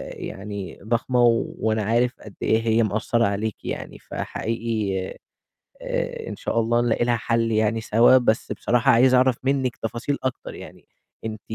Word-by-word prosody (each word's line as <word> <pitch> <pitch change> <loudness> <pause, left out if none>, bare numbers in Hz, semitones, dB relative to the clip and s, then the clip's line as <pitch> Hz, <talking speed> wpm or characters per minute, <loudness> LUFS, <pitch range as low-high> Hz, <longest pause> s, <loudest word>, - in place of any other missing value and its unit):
يعني 100 -1 -7
ضخمة 120 +2 +1
و 115 -1 +2
وأنا 110 -1 0
عارف 120 +3 +2
قد 105 - -12
إيه 110 +1 +2
هي 115 0 +2
مأثّرة 110 +3 +1
عليكِ 105 +2 -3
يعني، - - -5
فحقيقي، 110 -5 -3 0.8
آآ، - - -3
إن - - -6
شاء 115 - -1
الله 120 +1 +2
نلاقي 120 0 +1
لها 120 -1 +2
حل 115 0 0
يعني 110 +1 +1
سوا، 115 +4 +5
بس 115 -2 0
بصراحة 120 0 +2
عايز 130 +2 +5
أعرف 130 -1 +4
منِّك 135 -2 0
تفاصيل 120 +5 -3
أكتر 130 -1 -4
يعني، - - -12 0.4
أنتِ 110 -1 -5
115 Hz, 155 wpm, -23 LUFS, 110-120 Hz, 0.8 s, سوا